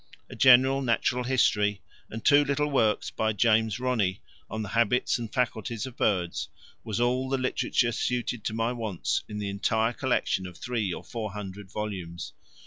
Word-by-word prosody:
A - - -7
general 130 +1 +6
Natural 125 0 +1
History 105 -6 +2 0.3
and 110 +1 -7
two 145 0 +6
little 145 +1 0
works 110 -6 +1
by 110 0 0
James 110 +1 +2
Ronnie 115 -7 0 0.3
on 110 +1 -3
the 100 - -6
habits 115 +3 +2
and 115 -2 -6
faculties 115 -2 -2
of 130 -2 -9
birds 90 -8 0 0.3
was 110 -1 -3
all 125 +2 +1
the 135 - +1
literature 130 -2 +1
suited 120 -1 -2
to - - -1
my 115 +2 0
wants 110 -7 -2
in 105 - -5
the 105 -1 -3
entire 110 +3 0
collection 120 -8 0
of 90 - -11
three 115 -6 -2
or - - -6
four 110 -4 -5
hundred 100 -1 -7
volumes. 95 -6 -5
115 Hz, 170 wpm, -27 LUFS, 105-125 Hz, 0.3 s, general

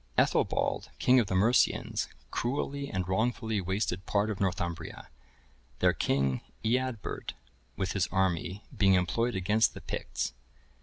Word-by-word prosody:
Ethelbald, - - +2
king 130 0 +5
of 115 - +1
the 95 - -1
Mercians, 110 +7 +2 0.2
cruelly 140 +3 -2
and 95 -1 -2
wrongfully 110 +2 0
wasted 95 0 -1
part 105 +1 +1
of 100 - -5
Northumbria, 85 -3 -3 0.7
their - - +4
king, 65 -1 +1 0.2
Eadbert, 125 -1 -1 0.4
with 95 +2 -1
his 95 -3 +1
army, 95 +1 0
being 100 -4 +5
employed 115 +7 +1
against 105 +4 +2
the - - -8
Picts. - - -3
100 Hz, 125 wpm, -30 LUFS, 90-115 Hz, 0.7 s, king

